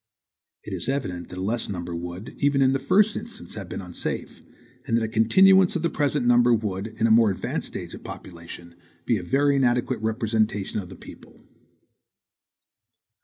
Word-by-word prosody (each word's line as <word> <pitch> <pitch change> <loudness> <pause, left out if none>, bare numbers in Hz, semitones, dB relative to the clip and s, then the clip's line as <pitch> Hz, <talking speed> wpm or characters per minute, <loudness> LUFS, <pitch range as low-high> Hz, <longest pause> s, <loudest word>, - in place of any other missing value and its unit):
It - - -7
is - - -3
evident 95 -11 -3
that 90 - -9
a 95 - -3
less 115 +4 -1
number 85 -3 -4
would, 90 +4 -6
even 140 -1 +3
in 130 0 +3
the 135 - 0
first 205 +10 +3
instance, 230 - -8
have 95 -4 -7
been 95 - -5
unsafe, 90 -1 -5 0.5
and 115 -2 +2
that 115 - 0
a - - 0
continuance 185 - +5
of 170 - -1
the 170 - +1
present 145 -3 0
number 120 0 +5
would, 105 -2 -3
in 110 0 -2
a 115 - +3
more 115 -1 +6
advanced 95 - -3
stage - - -7
of - - -10
population, 85 -1 -10 0.3
be - - +2
a - - -8
very 140 +1 +2
inadequate 125 -1 +1
representation 110 -3 -1
of 90 -3 -8
the 95 - -10
people. - - -15
115 Hz, 180 wpm, -24 LUFS, 95-135 Hz, 0.5 s, more